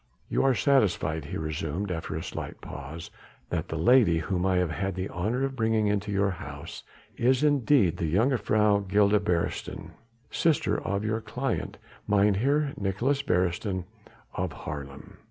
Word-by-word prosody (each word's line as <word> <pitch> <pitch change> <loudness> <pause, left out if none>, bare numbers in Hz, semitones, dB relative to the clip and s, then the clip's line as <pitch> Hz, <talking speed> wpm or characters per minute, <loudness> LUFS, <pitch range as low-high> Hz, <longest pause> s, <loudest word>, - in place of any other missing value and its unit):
"You - - +1
are 135 -2 +4
satisfied," 90 - +2
he 90 +6 -5
resumed 80 +5 -3
after 80 -2 -4
a 80 - -3
slight - - -6
pause, 75 +4 -8 0.4
"that - - -1
the 80 - -4
lady 95 0 +5
whom 90 +3 -1
I 95 - +2
have 90 -2 +1
had 95 +2 -2
the 95 +1 -2
honour 110 +9 -1
of 135 0 -2
bringing 110 -2 +1
into 105 0 0
your 100 0 +2
house 95 - -8 0.4
is 130 +3 +2
indeed 140 - +3
the 80 -2 -1
Jongejuffrouw 105 - +2
Gilda 100 +1 +4
Beresteyn, 85 -3 -2 0.4
sister 145 -10 +1
of 100 +1 -2
your 110 +1 -1
client - - -3 0.3
Mynheer 110 +9 +2
Nicolaes 115 +9 0
Beresteyn 90 -1 0 0.5
of - - -2
Haarlem?" 70 -1 -8
100 Hz, 150 wpm, -27 LUFS, 85-115 Hz, 0.5 s, lady